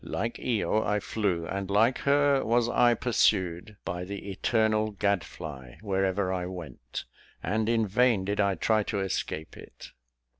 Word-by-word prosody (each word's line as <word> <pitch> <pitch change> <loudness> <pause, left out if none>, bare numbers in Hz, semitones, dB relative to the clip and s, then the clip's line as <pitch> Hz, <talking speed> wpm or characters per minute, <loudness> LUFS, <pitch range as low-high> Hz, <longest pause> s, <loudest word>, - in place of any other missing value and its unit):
Like 115 +4 -3
Io, 110 -2 0
I 105 0 +1
flew; 100 -5 -1
and 95 +2 -4
like 110 +5 +3
her, 140 -1 +3
was 120 +1 +2
I 120 0 +4
pursued 100 -5 +1
by 90 -2 -3
the 100 +1 -6
eternal 110 +1 +1
gad 100 -3 0
fly, 65 -6 -9
wherever 95 -1 0
I 90 -1 -2
went, 75 -10 -7 0.4
and 110 +4 0
in 115 -1 +2
vain 110 -1 +2
did 100 +1 -2
I 100 -1 +2
try 110 +5 +2
to 100 0 -2
escape 85 -4 -3
it. - - -12
100 Hz, 155 wpm, -28 LUFS, 95-110 Hz, 0.4 s, I